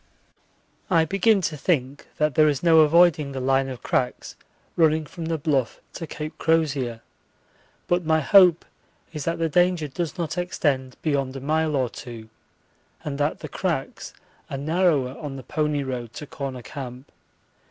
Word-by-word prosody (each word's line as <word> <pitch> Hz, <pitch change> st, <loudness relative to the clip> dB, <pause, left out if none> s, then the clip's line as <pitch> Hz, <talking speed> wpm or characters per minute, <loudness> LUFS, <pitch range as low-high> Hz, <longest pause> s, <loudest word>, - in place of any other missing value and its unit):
I 165 Hz, -4 st, +4 dB
begin 195 Hz, +3 st, +3 dB
to 165 Hz, -3 st, -2 dB
think 140 Hz, -3 st, -1 dB
that 150 Hz, -1 st, +1 dB
there 155 Hz, +3 st, +5 dB
is 145 Hz, 0 st, -2 dB
no 165 Hz, -2 st, +6 dB
avoiding 155 Hz, -2 st, +4 dB
the 135 Hz, -, -4 dB
line 135 Hz, +1 st, +1 dB
of 125 Hz, -3 st, -8 dB
cracks 125 Hz, -1 st, -2 dB, 0.4 s
running 160 Hz, -1 st, +3 dB
from 165 Hz, +3 st, -8 dB
the 165 Hz, 0 st, -1 dB
Bluff 140 Hz, -6 st, -1 dB
to 165 Hz, -, -6 dB
Cape 150 Hz, +1 st, -6 dB
Crozier, 140 Hz, -8 st, 0 dB, 0.8 s
but 175 Hz, 0 st, +1 dB
my 160 Hz, 0 st, +2 dB
hope 175 Hz, +2 st, +5 dB, 0.5 s
is 150 Hz, -3 st, -5 dB
that 165 Hz, -, -1 dB
the 165 Hz, -, 0 dB
danger 175 Hz, 0 st, +2 dB
does 165 Hz, +5 st, -4 dB
not 165 Hz, -1 st, -2 dB
extend 140 Hz, -7 st, -1 dB
beyond 140 Hz, -4 st, -1 dB
a -, -, -4 dB
mile 155 Hz, +2 st, 0 dB
or 130 Hz, -2 st, +1 dB
two, 115 Hz, -2 st, -10 dB, 0.7 s
and 145 Hz, -1 st, -4 dB
that 145 Hz, +1 st, -1 dB
the -, -, -5 dB
cracks -, -, -3 dB, 0.4 s
are 135 Hz, -, -4 dB
narrower 150 Hz, -3 st, +1 dB
on 145 Hz, -4 st, -6 dB
the 135 Hz, -, -8 dB
pony 150 Hz, +1 st, -1 dB
road 125 Hz, -3 st, -5 dB
to 150 Hz, -, -7 dB
Corner 135 Hz, -3 st, -6 dB
Camp. 130 Hz, -1 st, -8 dB
150 Hz, 165 wpm, -24 LUFS, 135-165 Hz, 0.8 s, no